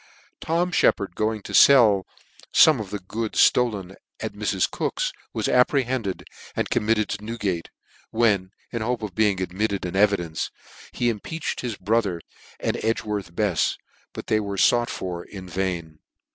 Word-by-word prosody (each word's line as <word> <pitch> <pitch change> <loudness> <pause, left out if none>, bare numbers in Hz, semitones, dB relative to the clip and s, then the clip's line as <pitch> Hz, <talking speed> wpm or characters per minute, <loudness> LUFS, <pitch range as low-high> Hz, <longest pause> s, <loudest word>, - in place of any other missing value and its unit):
Tom 175 +2 0
Shcppard 100 - +2
going 110 +1 -1
to - - -8
fell 110 -9 +6 0.4
fome 155 -5 +6
of 100 - -7
the 105 - -3
goods 110 +4 -5
ftolen 105 -7 +3 0.3
at - - -4
Mrs. - - 0
Cook's, - - -2 0.2
was - - -2
apprehended 125 -5 +1 0.3
and - - -2
com 105 - 0
mitted 110 -1 +2
to 100 - -4
Newgate, 105 -7 -3 0.4
when, 105 -5 +2 0.2
in 115 - -2
the 110 - -3
hope 120 -1 -1
of 105 -4 -5
being 105 -2 +2
admitted 95 +2 -2
an 90 - -4
evidence 95 -6 +1 0.4
he 120 - -1
impeached 120 +9 -4
his 120 -4 -3
brother 100 -3 0 0.4
and - - -1
Edgworth 105 -5 -2
Befs, 100 -5 +1 0.3
but - - -8
they 110 - +2
were 100 -2 -4
fought 120 +4 +3
for 90 -2 -4
in 95 -2 -10
vain. 85 -3 -3
105 Hz, 160 wpm, -24 LUFS, 95-115 Hz, 0.4 s, fell